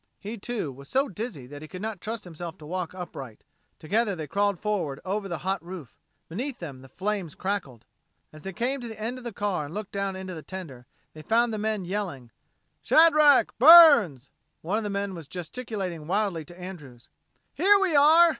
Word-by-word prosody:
He, 215 +3 -6
too, 220 - -4
was 140 +2 -13
so 270 +2 +2
dizzy 205 - -6
that 145 +3 -10
he 155 - -9
could 185 +3 -8
not 220 -4 -4
trust 225 +1 -5
himself 170 -1 -8
to 150 - -12
walk 180 +2 -4
upright. 140 -10 -8 0.3
Together 205 +5 0
they 160 -3 -5
crawled 200 +3 0
forward 185 -10 -2
over 200 +2 -2
the 170 -3 -3
hot 190 -2 -1
roof. 170 -7 -10 0.3
Beneath 245 - -4
them 140 -7 -8
the 135 - -14
flames 190 0 -3
crackled. 185 - -4 0.5
As 155 - -12
they 195 - -6
came 250 +7 -2
to 240 - -6
the 220 -1 -9
end 235 +4 -3
of - - -13
the 235 - -5
car 200 -7 -2
and 150 +5 -9
looked 210 -1 -5
down 195 -1 -2
into 190 -1 -6
the 160 - -7
tender, 150 -10 -9 0.3
they 155 - -10
found 230 +7 +2
the 215 - -3
men 215 -3 -1
yelling, 175 - -4 0.5
"Shadrack! 305 -3 +6
Burns!" 275 - +8 0.3
One 195 +7 0
of - - -5
the 210 - -3
men 200 -1 -2
was 165 -5 -9
gesticulating 180 - -5
wildly 190 -4 0
to 175 +4 -14
Andrews. 150 -10 -10 0.5
"Here 395 +8 +5
we 380 -5 +1
are!" 320 +4 +7
195 Hz, 200 wpm, -26 LUFS, 160-225 Hz, 0.5 s, Burns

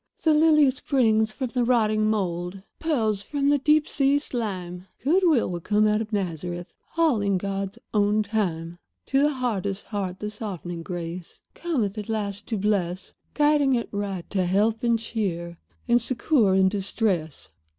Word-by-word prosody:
"The 315 - +4
lily 305 -3 +5
springs 225 -5 +1
from 255 +1 -4
the 250 -2 +1
rotting 215 -3 +2
mould; 185 -2 -2 0.2
Pearls 225 -11 0
from 280 +6 -1
the 290 0 +3
deep 300 +2 +3
sea 275 0 +2
slime; 190 -10 -4 0.2
Good 335 +8 +3
will 245 - +2
come 210 +5 +2
out 210 +1 +2
of 220 0 -6
Nazareth 175 -3 -3 0.2
All 310 -10 +3
in 200 -1 +1
God's 195 +2 -3 0.2
own 210 0 +2
time. 175 -6 -2 0.3
"To 270 0 +2
the 295 - +4
hardest 205 -6 -2
heart 195 -4 -4
the 210 0 -4
softening 180 -6 -6
grace 170 0 -7
Cometh, 230 - -2
at 210 - -7
last, 205 -2 -3
to 225 - -2
bless; 185 -3 -1 0.2
Guiding 295 -3 +3
it 235 - -2
right 200 -3 -4
to 185 -3 0
help 215 +4 +1
and 235 -1 +2
cheer 175 -7 -4 0.3
And 240 0 +4
succor 235 -4 +2
in 190 0 +5
distress. 190 - -1
210 Hz, 160 wpm, -25 LUFS, 190-250 Hz, 0.3 s, lily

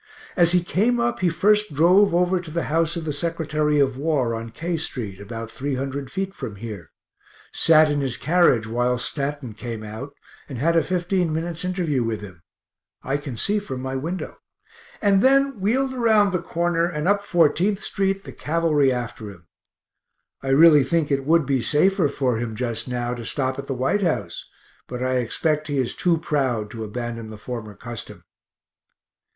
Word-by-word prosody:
As 170 -2 +5
he 180 -1 +3
came 225 +7 +1
up, 235 0 0
he 180 - +2
first 210 0 +2
drove 180 +4 +5
over 180 +1 +2
to 175 - -10
the 170 +2 -2
house 165 0 +1
of 165 -2 -4
the 150 - -2
Sec. 165 +3 -3
of 150 -3 +2
War, 140 -5 0
on 115 0 -5
K 165 +9 -3
st., 115 -11 -4
about 115 +2 -7
300 135 0 -4
feet 195 +3 -3
from 120 - -7
here; 105 -4 -8 0.6
sat 155 -2 +5
in 145 -1 0
his 130 -3 -1
carriage 160 -9 +3
while 120 +2 0
Stanton 140 -1 -4
came 115 0 -6
out 115 +7 -8 0.3
and 135 - -6
had 165 +7 +1
a 165 - +4
15 180 +1 0
minutes 165 +1 -3
interview 175 -8 0
with 115 -2 -3
him 90 -5 -11 0.6
(I 135 +2 -1
can 140 -5 -7
see 210 - +1
from 130 -11 -6
my 130 0 -3
window), 165 +8 -4 0.7
and 200 -2 +4
then 275 -1 +3
wheeled 260 +7 +1
around 220 -5 +3
the 180 -2 -1
corner 170 0 0
and 150 -1 -3
up 200 0 +3
Fourteenth 175 +2 +2
st., 195 -1 -1
the - - -9
cavalry 150 -3 +1
after 120 -3 -4
him. 90 -4 -14 1.0
I 135 - -7
really 150 +1 +7
think 155 +1 0
it 135 -1 0
would 165 -1 +4
be 135 -2 +1
safer 160 - +3
for 130 -4 0
him 115 -1 -4
just 115 0 -3
now 120 -1 -2
to 120 -1 -6
stop 130 +2 -2
at 140 - -7
the 135 - -2
White 130 +11 0
House, 115 - -2 0.4
but 125 0 -5
I 130 0 +1
expect 150 +5 -1
he 145 -2 -2
is 130 -3 -1
too 175 -2 +2
proud 130 -9 -1
to 115 -2 -6
abandon 115 +1 -5
the 110 - -9
former 110 -2 -7
custom. 115 +2 -8
145 Hz, 180 wpm, -23 LUFS, 125-175 Hz, 1.0 s, really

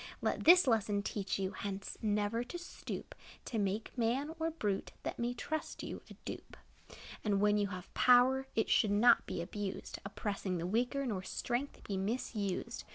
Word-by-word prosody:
Let - - -1
this 355 +1 +9
lesson 215 -4 +2
teach 200 -2 -2
you, 190 -1 -1
Hence 195 -1 -5
never 210 +2 +1
to 250 - -6
stoop 350 - -7 0.3
To 225 - -2
make 200 +2 -1
man, 260 +6 0
or 325 0 +1
brute, 210 -12 -2
That - - -4
may 240 +1 -1
trust 315 +5 -4
you, - - -5
a - - -10
dupe. - - -7 0.7
And 205 -2 +2
when 210 +1 +4
you 205 - +2
have 185 -2 -8
power, 255 +2 +5
It 220 - +2
should 215 - +4
not 230 +4 +5
be 170 - -2
abused, 200 +2 -5
Oppressing 195 -2 -3
the 170 - -3
weaker, 245 +8 0
Nor 205 -7 -1
strength 240 +8 -3
be 200 - -3
misused. 200 -1 -2
215 Hz, 170 wpm, -34 LUFS, 200-245 Hz, 0.7 s, this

